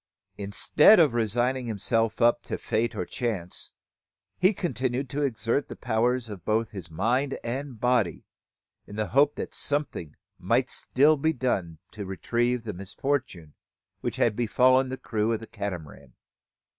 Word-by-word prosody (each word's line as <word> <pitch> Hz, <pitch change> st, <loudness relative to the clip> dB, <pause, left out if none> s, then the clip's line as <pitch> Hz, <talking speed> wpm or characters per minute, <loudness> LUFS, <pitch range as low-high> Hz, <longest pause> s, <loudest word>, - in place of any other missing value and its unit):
Instead 115 Hz, -, +5 dB
of 150 Hz, -7 st, +5 dB
resigning 120 Hz, +3 st, 0 dB
himself 115 Hz, +2 st, 0 dB
up 120 Hz, 0 st, +4 dB
to -, -, -5 dB
fate 115 Hz, +1 st, -1 dB
or 90 Hz, -, -2 dB
chance, 100 Hz, -8 st, -3 dB, 0.7 s
he 185 Hz, +2 st, +5 dB
continued 135 Hz, -, -2 dB
to 145 Hz, -, -2 dB
exert 120 Hz, 0 st, 0 dB
the -, -, -8 dB
powers 120 Hz, +2 st, 0 dB, 0.2 s
both 110 Hz, +1 st, 0 dB
of -, -, -32 dB
his 95 Hz, -5 st, -8 dB
mind 120 Hz, -, 0 dB
and 130 Hz, 0 st, -4 dB
body, 120 Hz, -9 st, +1 dB, 0.6 s
in 105 Hz, -, -9 dB
the 105 Hz, -3 st, -2 dB
hope 140 Hz, +5 st, +4 dB
that -, -, -5 dB
something 145 Hz, -, -2 dB, 0.2 s
might -, -, +1 dB
still 150 Hz, +4 st, +3 dB
be 160 Hz, +3 st, +1 dB
done 95 Hz, -, -2 dB
to 105 Hz, -, -7 dB
retrieve 120 Hz, +6 st, -1 dB
the 110 Hz, -2 st, -5 dB
misfortune 95 Hz, -, -3 dB, 0.5 s
which -, -, -3 dB
had 110 Hz, -3 st, +2 dB
befallen 130 Hz, +3 st, +3 dB
the 130 Hz, -, -4 dB
crew 110 Hz, -2 st, -1 dB
of 110 Hz, -, -1 dB
the 115 Hz, -, -9 dB
Catamaran. 90 Hz, -9 st, -7 dB
120 Hz, 150 wpm, -27 LUFS, 105-130 Hz, 0.7 s, Instead